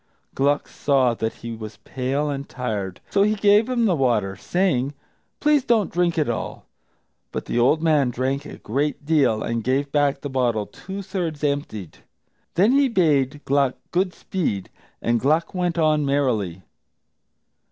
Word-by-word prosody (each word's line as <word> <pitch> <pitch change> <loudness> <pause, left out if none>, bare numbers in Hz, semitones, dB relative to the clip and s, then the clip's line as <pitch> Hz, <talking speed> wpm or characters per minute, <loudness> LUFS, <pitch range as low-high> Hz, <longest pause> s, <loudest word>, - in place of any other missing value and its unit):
Gluck 145 +2 +1
saw 135 -4 +2
that 110 -1 -2
he 115 - -4
was 110 -1 -8
pale 135 +3 -2
and 140 -1 -4
tired, 105 -7 -4
so 200 - +3
he 210 +2 +3
gave 205 +3 +4
him 240 -2 +2
the 195 - +3
water, 115 - +1
saying, 145 - 0 0.4
"Please 295 -2 +3
don't 225 -5 +2
drink 175 -1 +1
it 155 - +2
all." 120 -2 -4 0.7
But - - -4
the 120 - -1
old 150 +7 +3
man 150 -5 +3
drank 130 +3 -1
a 150 - -9
great 145 +6 -2
deal, 140 -8 +2
and 115 -1 -2
gave 135 +3 0
back 145 -1 +1
the - - -4
bottle 120 -6 0
two 195 - -8
thirds 175 -6 -4
emptied. 140 - -3 0.6
Then 200 +7 +4
he 280 +1 +4
bade 145 - +1
Gluck 140 -1 +2 0.2
good 185 +1 +1
speed, 105 - -3 0.3
and 115 0 +2
Gluck 155 +7 +1
went 180 -2 -1
on 155 -2 +3
merrily. 115 -11 0
145 Hz, 160 wpm, -23 LUFS, 125-175 Hz, 0.7 s, gave